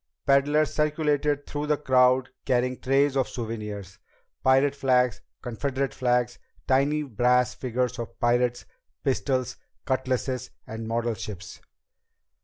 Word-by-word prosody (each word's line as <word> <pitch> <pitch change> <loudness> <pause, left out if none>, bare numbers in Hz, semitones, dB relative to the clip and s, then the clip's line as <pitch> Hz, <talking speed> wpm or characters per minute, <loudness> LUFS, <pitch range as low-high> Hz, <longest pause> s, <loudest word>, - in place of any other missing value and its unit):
Peddlers 145 +2 +3
circulated 150 -1 +1
through 145 0 -4
the 150 -1 +2
crowd 130 -2 +3 0.2
carrying 125 -1 +1
trays 135 +1 +2
of 135 -2 +2
souvenirs 105 -5 -6 0.4
pirate 135 +2 +4
flags, 125 -4 +2 0.2
Confederate 135 +2 -2
flags, 125 -1 0 0.3
tiny 140 +3 +2
brass 125 0 +2
figures 125 0 -2
of 120 - -7
pirates, 120 0 +1 0.4
pistols, 130 -2 0 0.3
cutlasses, 130 -1 -1 0.2
and 110 0 -6
model 115 +1 0
ships. 95 -3 -8
130 Hz, 110 wpm, -26 LUFS, 120-140 Hz, 0.4 s, pirate